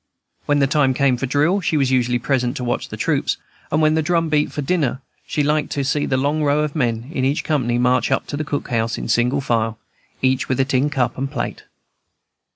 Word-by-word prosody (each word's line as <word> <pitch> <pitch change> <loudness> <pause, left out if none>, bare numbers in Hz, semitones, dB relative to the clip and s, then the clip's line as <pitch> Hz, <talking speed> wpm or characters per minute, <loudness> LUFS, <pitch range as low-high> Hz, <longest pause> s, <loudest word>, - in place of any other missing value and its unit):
When 145 - +3
the 140 - +4
time 135 -2 +2
came 135 -1 +3
for 135 +2 -3
drill 150 +9 +2
she 160 -2 0
was 135 -2 +1
usually 125 -1 +2
present 125 +1 -1
to 125 - -4
watch 120 0 -2
the - - -7
troops; - - 0 0.3
and 155 +1 +2
when 155 0 +4
the 160 - +2
drum 165 +1 +1
beat 150 -1 +1
for 145 - -4
dinner 140 -5 0 0.3
she 150 - 0
liked 150 0 +1
to 140 - -1
see 145 +2 0
the 130 - +1
long 145 +4 0
row 145 +1 +2
of 150 0 -2
men 120 -2 -1
in 130 - -1
each 145 +4 +1
company 125 -7 0
march 125 +1 +2
up - - +1
to - - -5
the 150 - -2
cookhouse, 120 -6 -2
in - - -5
single 125 +4 +2
file, 115 -3 0 0.5
each 130 0 +1
with 130 +1 +1
tin 135 +2 +1
cup 125 -4 -1
and 135 +1 -2
plate. 135 -4 -4
135 Hz, 225 wpm, -20 LUFS, 125-150 Hz, 0.5 s, the